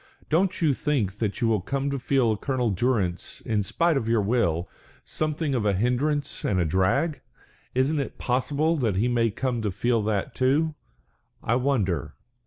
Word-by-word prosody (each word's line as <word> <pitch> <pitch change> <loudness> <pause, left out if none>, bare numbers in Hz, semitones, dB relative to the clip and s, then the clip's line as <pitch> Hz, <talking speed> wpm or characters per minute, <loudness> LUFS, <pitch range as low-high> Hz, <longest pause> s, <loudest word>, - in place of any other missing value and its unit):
Don't 180 +3 +1
you 150 -3 +4
think 115 -9 -1
that 110 +1 -2
you 115 - +3
will 110 -4 +2
come 140 +7 -2
to 140 - -2
feel 125 -3 +2
Colonel 125 0 -1
Durrance, 95 -4 -1
in 110 -2 -1
spite 165 - +1
of 115 - -2
your 115 -2 +2
will, 100 -6 +1 0.4
something 155 -1 -2
of 120 -4 0
a 105 -1 +2
hindrance 130 +8 0
and 95 - +1
a 85 - +2
drag? 95 - +1 0.5
Isn't 140 +4 +2
it 140 - -4
possible 145 +6 0
that 115 -8 0
he 105 +6 +2
may 120 -2 +2
come 120 +2 -2
to 105 - -1
feel 115 +4 +1
that 105 -3 -1
too? 145 +5 +2 0.7
I 115 - +1
wonder. 120 - 0
125 Hz, 175 wpm, -25 LUFS, 105-140 Hz, 0.7 s, you